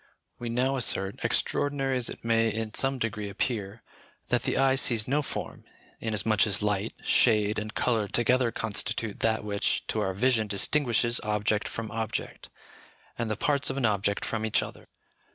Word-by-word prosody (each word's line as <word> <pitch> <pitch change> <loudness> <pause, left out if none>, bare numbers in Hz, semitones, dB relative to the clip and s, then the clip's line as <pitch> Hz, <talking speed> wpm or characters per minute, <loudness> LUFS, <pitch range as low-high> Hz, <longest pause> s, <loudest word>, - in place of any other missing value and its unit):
We 120 - -5
now 130 +3 0
assert, 95 -6 +2
extraordinary 135 -2 0
as 125 -2 +2
it - - -9
may 115 -1 +2
in 110 0 -4
some 135 0 +2
degree 105 -4 -3
appear, 105 0 -3 0.5
that - - +2
the - - -1
eye 135 0 +4
sees 120 -4 +2
no 145 +3 +1
form, 140 - -6 0.4
inasmuch 110 -1 +2
as 105 0 0
light, 105 +1 0
shade, 105 -3 +3
and 105 0 -6
colour 115 -4 0
together 120 +3 +1
constitute 105 0 -2
that 110 -1 0
which 100 -1 -1
to - - -1
our 95 -1 -2
vision 115 0 +2
distinguishes 120 +2 +2
object 105 0 0
from 115 -1 -6
object, 110 -1 -5 0.7
and 115 -1 -3
the 110 - -2
parts 145 -2 +2
of 135 - -3
an 135 - 0
object 100 -2 0
from 110 -1 -3
each 110 - +1
other. - - -11
110 Hz, 170 wpm, -27 LUFS, 105-125 Hz, 0.7 s, eye